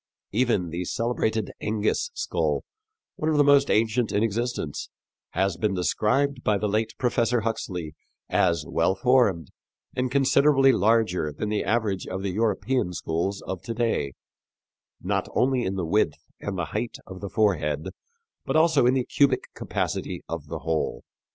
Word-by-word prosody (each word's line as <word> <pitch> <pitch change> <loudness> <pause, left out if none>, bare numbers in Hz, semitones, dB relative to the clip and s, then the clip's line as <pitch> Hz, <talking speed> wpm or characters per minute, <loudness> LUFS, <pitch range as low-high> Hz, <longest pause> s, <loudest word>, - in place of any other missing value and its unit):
Even 105 -7 +1
the 85 +2 -3
celebrated 110 +1 -1
Engis 105 - 0
skull, - - -1 0.5
one 155 - 0
of 155 - +2
the 145 - +6
most 140 -1 +5
ancient 110 +2 +2
in 105 - +1
existence, 115 - -2 0.4
has 95 -1 +1
been 100 +2 0
described 130 - +1
by 105 -1 +2
the 105 - -1
late 110 +2 -1
Professor 120 -1 +1
Huxley 95 -8 -3 0.3
as 85 -1 +2
well 95 - +1
formed 100 - +2 0.5
and 125 0 0
considerably 135 +1 +4
larger 105 -8 +2
than 105 +8 -4
the 105 -1 0
average 105 -3 0
of 95 +1 -4
the 100 - -1
European 105 0 0
skulls 85 +4 -2
of 95 -3 -5
to 115 - -5
day, 115 - 0 0.9
not - - 0
only 130 0 +2
in 95 - -2
the 90 -3 -2
width 80 -4 +1 0.2
and 95 -2 -4
height 100 +7 -3
of 95 -1 -10
the 100 - -5
forehead, 80 -8 +1 0.5
but - - -2
also 155 -5 +4
in 125 - +4
the 130 -2 0
cubic 135 -3 +1
capacity - - -3
of 85 -3 -5
the 80 +1 -5
whole. 80 -1 -1
105 Hz, 155 wpm, -25 LUFS, 90-125 Hz, 0.9 s, the